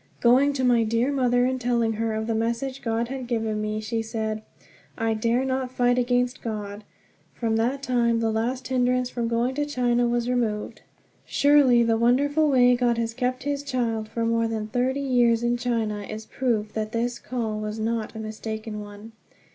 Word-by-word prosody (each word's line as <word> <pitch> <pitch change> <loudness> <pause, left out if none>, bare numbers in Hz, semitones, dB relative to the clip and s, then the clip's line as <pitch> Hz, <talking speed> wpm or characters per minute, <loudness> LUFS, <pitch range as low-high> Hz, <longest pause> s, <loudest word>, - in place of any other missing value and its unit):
Going 255 +4 +5
to 265 -2 -2
my 240 -2 +4
dear 230 +5 +1
mother 245 -3 +2
and 260 0 -1
telling 235 -2 +1
her 225 0 -2
of 220 0 -2
the 225 - -1
message 235 +4 -2
God 230 -1 -1
had 265 -2 -5
given 220 -3 -1
me, 215 0 -2
she 225 +1 -2
said: 220 -1 -3 0.6
"I 225 0 0
dare 230 +4 +1
not 260 -1 -1
fight 245 0 +2
against 245 0 0
God." 210 -2 -5 0.5
From 225 -2 -1
that 255 +5 0
time 235 -2 +2
the 225 -1 +1
last 250 +4 -2
hindrance 250 -1 +1
from 235 -2 -2
going 235 +2 0
to 295 +2 -1
China 245 -3 +1
was 240 0 0
removed. 230 -4 -1 0.4
Surely 280 -5 +4
the 230 -1 +2
wonderful 285 +6 +3
way 250 -2 +5
God 240 -1 +1
has 230 0 -1
kept 255 +1 -2
his 285 0 -1
child 235 -6 -2
for 230 0 -2
more 230 0 +1
than 220 -1 -3
thirty 255 +3 0
years 240 -4 +2
in 240 0 +2
China 230 -4 -1
is 215 +2 -7
proof 220 -5 -1
that 215 0 -3
this 235 +1 -1
"call" 225 -4 -3
was 215 0 -4
not 225 0 -2
a - - -6
mistaken 220 0 -5
one. 205 +2 -11
235 Hz, 185 wpm, -25 LUFS, 225-250 Hz, 0.6 s, Going